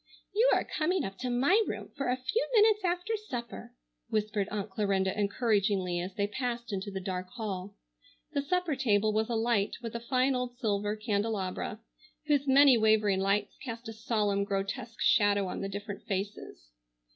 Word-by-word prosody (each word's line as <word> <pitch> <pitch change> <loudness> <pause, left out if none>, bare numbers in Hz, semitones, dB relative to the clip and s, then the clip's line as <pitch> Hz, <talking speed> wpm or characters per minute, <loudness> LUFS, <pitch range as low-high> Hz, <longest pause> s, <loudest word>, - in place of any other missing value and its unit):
"You 460 +5 +4
are - - +2
coming 350 +4 0
up 195 0 -7
to 255 - -2
my 275 - +4
room - - -5
for 275 -3 -2
a 250 - +1
few 260 - -1
minutes 425 -1 +5
after 360 +4 0
supper," 245 - -7 0.3
whispered 210 -2 -1
Aunt 205 -1 -4
Clarinda 190 -1 0
encouragingly 200 -4 +1
as 180 +2 -5
they 200 - +1
passed 235 +1 -3
into 195 +1 -3
the 195 -1 -4
dark 185 -1 -4
hall. 205 -5 -5 0.6
The 285 - +1
supper 355 +1 0
table 215 -5 +2
was 220 +1 0
alight 225 -3 +1
with 230 - -5
a 235 - -3
fine 255 +3 +1
old 250 -1 -3
silver 210 -3 0
candelabra 210 -1 -2 0.4
whose 290 -2 +2
many 270 -2 +7
wavering 215 -3 +3
lights 200 +1 0
cast 235 -2 -6
a - - -6
solemn, 210 -3 0
grotesque 200 +3 -3
shadow 205 -1 +4
on - - -4
the 195 - -3
different 205 +1 -6
faces. 195 - -5
215 Hz, 170 wpm, -30 LUFS, 200-255 Hz, 0.6 s, many